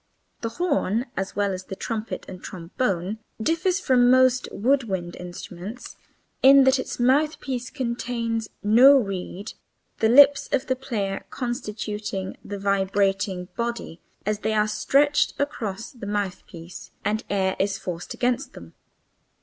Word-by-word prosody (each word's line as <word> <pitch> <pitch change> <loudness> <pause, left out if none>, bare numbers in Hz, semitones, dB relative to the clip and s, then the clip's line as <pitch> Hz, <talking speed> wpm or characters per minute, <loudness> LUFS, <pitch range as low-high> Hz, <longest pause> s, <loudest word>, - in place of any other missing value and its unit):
The 230 - -2
horn 240 - 0
(as 190 0 -3
well 200 -1 +1
as 185 0 -6
the 195 - -6
trumpet 225 +2 -4
and 185 -1 -9
trombone) 185 +2 -3 0.2
differs 330 - +1
from 250 -8 +4
most 255 0 +4
of - - -13
the - - 0
wood 275 -2 +4
wind 180 -4 -4
instruments 180 +5 -8 0.5
in 275 +1 +8
that 265 0 +4
its 260 - -5
mouthpiece 260 -1 +1
contains 235 -3 -2
no 250 +7 +7
reed, 195 -2 -4 0.5
the 220 - +3
lips 280 +3 +7
of 275 -1 +1
the 260 - 0
player 215 -7 -3
constituting 210 -5 -4
the 205 - -6
vibrating 195 -1 0
body 235 -8 -4 0.3
as 210 0 0
they 220 - -1
are 210 0 +3
stretched 285 +7 +2
across 225 -5 -3
the 235 -7 -9
mouthpiece 185 -4 -5 0.2
and 215 +2 0
air 190 -1 +1
is 195 0 0
forced 175 -1 -6
against 250 +1 -1
them. - - -12
220 Hz, 140 wpm, -24 LUFS, 195-255 Hz, 0.5 s, in